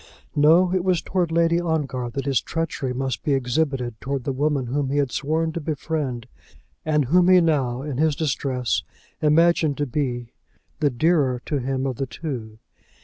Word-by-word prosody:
No; 165 +5 +5
it 185 -2 +1
was 185 -2 +2
towards 180 -3 -1
Lady 170 +1 +3
Ongar 145 -7 -2
that 135 +3 -4
his 135 -6 +2
treachery 165 -5 -3
must 130 +1 -2
be 145 - 0
exhibited; 125 -2 -1
towards 135 -2 -3
the 135 - -1
woman 140 -1 0
whom 135 +2 -1
he 140 - -1
had 140 -3 +1
sworn 160 +3 -1
to 170 - -4
befriend, 145 -5 -3 0.6
and 150 -2 +1
whom 175 +7 +4
he 185 -1 +7
now, 135 -7 +1
in 145 -4 -4
his 155 -1 +2
distress, 135 -4 -1 0.4
imagined 155 -1 +3
to 145 - 0
be 120 -3 -3 0.5
the 150 -3 +3
dearer 135 -1 +2
to 145 - -1
him 130 +1 -2
of 130 -3 -2
the 135 - -2
two. 120 -8 -6
145 Hz, 175 wpm, -23 LUFS, 130-160 Hz, 0.6 s, he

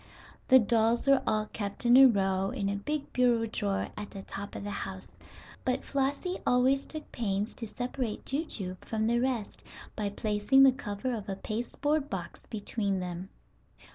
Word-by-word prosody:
The 260 - +8
dolls 230 +1 +2
were 275 -1 +5
all 215 -1 +2
kept 200 +3 -4
in 240 +1 +7
a 270 +1 +10
row 195 -4 +1
in 200 0 -2
a 200 - -1
big 290 +9 -4
bureau 240 -2 +3
drawer 205 -3 -2
at 210 -1 -6
the 195 - -8
top 200 +1 -7
of - - -5
the 205 - -4
house, 95 - -6 0.5
but 255 - -1
Flossie 280 +7 -1
always 260 +2 +3
took 310 -1 -8
pains 205 -2 -2
to 230 - -6
separate 245 -1 -4
Jujube 215 - -3
from 220 -1 -1
the 235 +1 +2
rest 245 -4 -2 0.3
by 210 -2 -1
placing 210 +6 +3
the 270 - +8
cover 240 0 -4
of 210 -3 -5
a 195 - -2
pasteboard 270 +8 -2
box - - -6
between 205 -2 -1
them. 180 +1 -5
225 Hz, 170 wpm, -30 LUFS, 200-260 Hz, 0.5 s, a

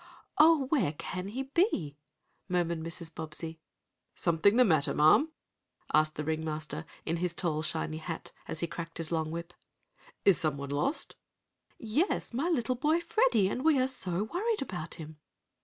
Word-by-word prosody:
"Oh, 310 -2 +6
where 255 - +2
can 180 +4 -5
he 250 +7 -3
be?" 270 - 0 0.5
murmured 170 -2 0
Mrs. 165 0 -6
Bobbsey. 160 +1 -4 0.6
"Something 170 +5 +3
the 250 +1 +6
matter, 160 -8 +3
ma'am?" 155 - +5 0.6
asked 155 0 +4
the 150 - -3
ring 160 +1 -1
master, 155 0 -4 0.2
in 165 +1 0
his 175 0 -2
shiny 155 -1 -1
tall 160 - -11
hat, 165 -2 -5 0.2
as 160 - -3
he - - +1
cracked 165 0 -7
his 165 -1 -3
long 160 -2 0
whip. 170 +1 -6 0.7
"Is 195 -3 +6
someone 140 -3 -2
lost?" 210 - -1 0.6
"Yes, 240 - 0
my 280 +9 0
little 255 -7 +1
boy 300 +6 +2
Freddie, 335 - +3
and 250 +6 -2
we 310 -3 +4
are 255 - +3
so 195 -8 -1
worried 415 - -1
about 175 -9 -5
him!" 155 -1 -9
170 Hz, 160 wpm, -30 LUFS, 160-255 Hz, 0.7 s, Oh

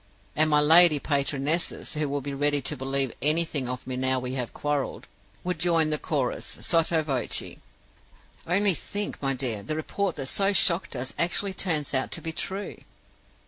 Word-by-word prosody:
And 155 +1 +3
my 150 -1 +4
lady 160 +1 +7
patronesses, 140 +3 -1
who 150 -2 -2
will 140 0 -2
be 140 +1 -5
ready 145 +1 +1
to 150 - -2
believe 135 -1 -1
anything 150 -3 +1
of 125 0 -5
me 130 0 -4
now 130 0 +1
we 125 0 -5
have 125 -3 -3
quarreled, 145 -2 -3 0.4
would 180 -2 -3
join 165 -2 +2
the 150 - +1
chorus 135 -6 -2
sotto 165 -1 +2
voce: 135 -5 -3 0.9
'Only 195 +3 +3
think, 205 +5 -5
my 135 -1 0
dear, 120 -5 -2
the 155 +9 -4
report 195 +5 -2
that 135 - -5
so 195 +8 +2
shocked 175 -5 +2
us 130 +1 -4
actually 190 +3 +1
turns 160 -7 0
out 130 -1 +1
to - - -1
be 165 - -4
true! 195 +5 -4
150 Hz, 175 wpm, -26 LUFS, 135-170 Hz, 0.9 s, lady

